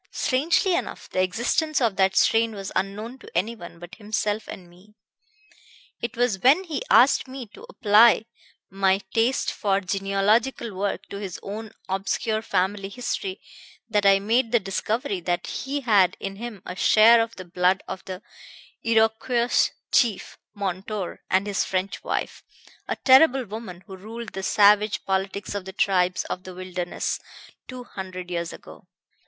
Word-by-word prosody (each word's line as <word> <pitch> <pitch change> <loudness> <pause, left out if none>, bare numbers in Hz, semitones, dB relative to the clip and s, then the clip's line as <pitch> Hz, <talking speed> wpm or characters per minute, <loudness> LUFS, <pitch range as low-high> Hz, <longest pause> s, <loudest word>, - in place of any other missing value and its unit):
Strangely 335 +8 +1
enough, 350 - -3
the 185 - +1
existence 245 - 0
of 230 -6 +1
that 190 0 +2
strain 225 0 +3
was 195 -1 -6
unknown 210 +7 -3
to - - -13
anyone 185 -3 -3
but 175 +2 -12
himself 210 0 -2
and 180 - -9
me. 185 +5 -21 1.1
It 235 0 -4
was 240 -5 +1
when 280 - +5
he 315 -7 -4
asked 265 +2 +5
me 260 -1 -7
to 475 - -13
apply 220 - +5 0.5
my 195 0 +2
taste 235 +3 +1
for 195 -2 +1
genealogical 200 +5 0
work 200 +1 -2
to 200 - -6
his 195 -3 -6
own 215 +2 -6 0.2
obscure 200 +3 -1
family 195 -1 -1
history 200 -4 -4 0.5
that 210 -2 +2
I 195 0 +7
made 225 +4 +1
the 240 - +4
discovery 200 +1 -2
that 175 0 -2
he 280 +2 -4
had 205 -7 +3
in 195 0 -6
him 220 -4 -8
a 180 - -6
share 225 +4 +6
of 230 0 -3
the 185 - -9
blood 180 +2 +1
of 190 - -6
the 190 +1 -7 0.6
Iroquois 230 +2 +2 0.2
chief 235 -7 +1 0.2
Montour 195 0 -4
and 190 +2 +2
his 200 -1 0
French 190 +1 -3
wife, - - -3 0.4
a - - -1
terrible 265 -1 +5
woman 195 -4 -8
who 195 -3 -9
ruled 225 +4 -8
the 195 - -6
savage 210 +2 +3
politics 195 +1 -2
of 200 -2 -4
the 190 - -7
tribes 185 -2 +1
of 180 - -5
the 185 -1 -9
Wilderness 180 -1 -3 0.5
two 255 -1 -8
hundred 185 -4 -8
years 170 -1 -2
ago. - - -13
205 Hz, 155 wpm, -24 LUFS, 190-235 Hz, 1.1 s, I